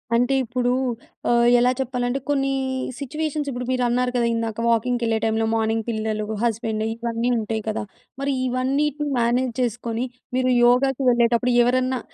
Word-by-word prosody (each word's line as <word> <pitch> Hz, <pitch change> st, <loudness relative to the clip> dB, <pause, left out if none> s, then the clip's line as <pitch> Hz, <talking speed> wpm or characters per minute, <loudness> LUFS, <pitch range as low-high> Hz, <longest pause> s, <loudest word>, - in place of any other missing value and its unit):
అంటే, 245 Hz, +3 st, +2 dB
ఇప్పుడూ 245 Hz, +1 st, -1 dB, 0.6 s
ఆహ్, 235 Hz, 0 st, +4 dB
ఎలా 245 Hz, +1 st, +4 dB
చెప్పాలంటే 250 Hz, 0 st, -1 dB
కొన్నీ 275 Hz, -1 st, +1 dB, 0.5 s
సిచ్యువేషన్స్, 300 Hz, +1 st, -3 dB
ఇప్పుడు 250 Hz, 0 st, -4 dB
మీరన్నారు 250 Hz, 0 st, +1 dB
కదా! 240 Hz, -1 st, +2 dB
ఇందాక, 225 Hz, -1 st, -3 dB
వాకింగ్‌కెళ్ళే 230 Hz, 0 st, +1 dB
టైమ్‌లో, 225 Hz, 0 st, +1 dB
మార్నింగ్ 225 Hz, 0 st, 0 dB
పిల్లలు, 215 Hz, -1 st, -2 dB, 0.2 s
హస్బెండు, 225 Hz, -1 st, -1 dB
ఇవన్నీ 230 Hz, +1 st, -2 dB
ఉంటాయి 220 Hz, 0 st, -3 dB
కదా! 215 Hz, -, -2 dB, 0.4 s
మరి 280 Hz, 0 st, 0 dB, 0.2 s
ఇవన్నీటిని 280 Hz, +4 st, 0 dB
మేనేజ్ 240 Hz, +1 st, +1 dB
చేసుకొని, 235 Hz, 0 st, -2 dB, 0.3 s
మీరు 255 Hz, 0 st, +2 dB
యోగాకి 265 Hz, +2 st, +3 dB
వెళ్ళేటప్పుడు 240 Hz, +1 st, +2 dB
ఎవరన్నా 255 Hz, +1 st, +1 dB
245 Hz, 135 wpm, -23 LUFS, 230-255 Hz, 0.6 s, ఆహ్